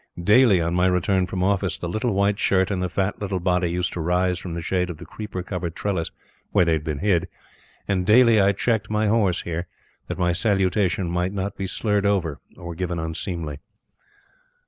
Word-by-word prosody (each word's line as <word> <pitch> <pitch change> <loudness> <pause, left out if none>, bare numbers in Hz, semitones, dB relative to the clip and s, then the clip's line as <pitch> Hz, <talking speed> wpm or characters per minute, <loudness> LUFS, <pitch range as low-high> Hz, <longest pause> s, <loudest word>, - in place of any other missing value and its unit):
Daily 105 0 +5
on 85 0 -1
my 90 +1 +3
return 90 +1 +1
from 90 0 -2
office, 95 -2 +1
the 85 - -5
little 110 +4 -1
white 100 +1 +1
shirt, 95 +1 +2
and 95 -2 -1
the 90 - -1
fat 95 +3 -2
little 95 -2 -2
body 90 -1 +1
used 90 +1 -2
to - - -5
rise 90 +2 +1
from 85 -3 -6
the - - -3
shade 90 +1 0
of 85 - -6
the - - -10
creeper 105 -4 -6
covered 90 -3 -4
trellis 95 -5 -2 0.4
where 90 - +3
they 85 - +2
had 80 -1 -1
been 75 -2 -3
hid; 90 -2 +1 0.6
and 95 -2 0
daily 110 +2 +6
I 100 +1 +4
checked 110 +2 -1
my 105 0 +1
horse 105 -4 +2
here, 85 +1 -4 0.4
that - - -4
my 90 -1 +1
salutation 95 0 +1
might 90 +2 -1
not 100 0 -3
be 95 - -4
slurred 105 0 0
over 85 -7 0 0.2
or 85 -1 -7
given 90 0 -3
unseemly. 80 -2 -4
90 Hz, 200 wpm, -23 LUFS, 85-100 Hz, 0.6 s, daily